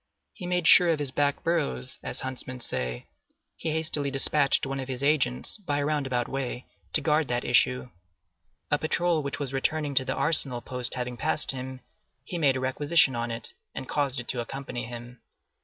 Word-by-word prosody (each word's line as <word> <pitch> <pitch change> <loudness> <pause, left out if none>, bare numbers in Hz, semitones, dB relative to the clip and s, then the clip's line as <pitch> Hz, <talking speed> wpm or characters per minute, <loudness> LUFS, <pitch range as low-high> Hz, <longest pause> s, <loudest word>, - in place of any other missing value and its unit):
He 180 - -7
made 180 -1 0
sure 175 -1 +8
of 165 - +2
his 145 -3 -2
back 145 0 0
burrows, 145 - -1
as - - -4
huntsmen 130 -1 -5
say; 60 - -2 0.5
he - - -4
hastily 155 -2 0
despatched 140 +1 +3
one 135 0 -3
of 130 - -5
his 130 0 -4
agents, 135 - +2
by 160 -9 -2
a 145 - 0
roundabout 135 -5 0
way, 130 -2 -4 0.3
to - - +5
guard 155 -1 +2
that 120 0 -1
issue. 125 0 +2 0.8
A 145 - +3
patrol 170 +1 +1
which 140 -1 -4
was 140 -2 -4
returning 145 +2 0
to 130 - +3
the - - -2
Arsenal 140 -6 +4
post 125 0 -3
having 125 -1 -4
passed - - +2
him, 130 0 -4 0.4
he 175 -4 -4
made 140 -4 +3
a - - -2
requisition 135 +2 +2
on 120 0 -2
it, 115 0 -4 0.3
and 130 - -6
caused 140 -3 -1
it 120 - -7
to 125 - -1
accompany 130 0 -5
him. 120 +1 -9
135 Hz, 190 wpm, -27 LUFS, 125-150 Hz, 0.8 s, sure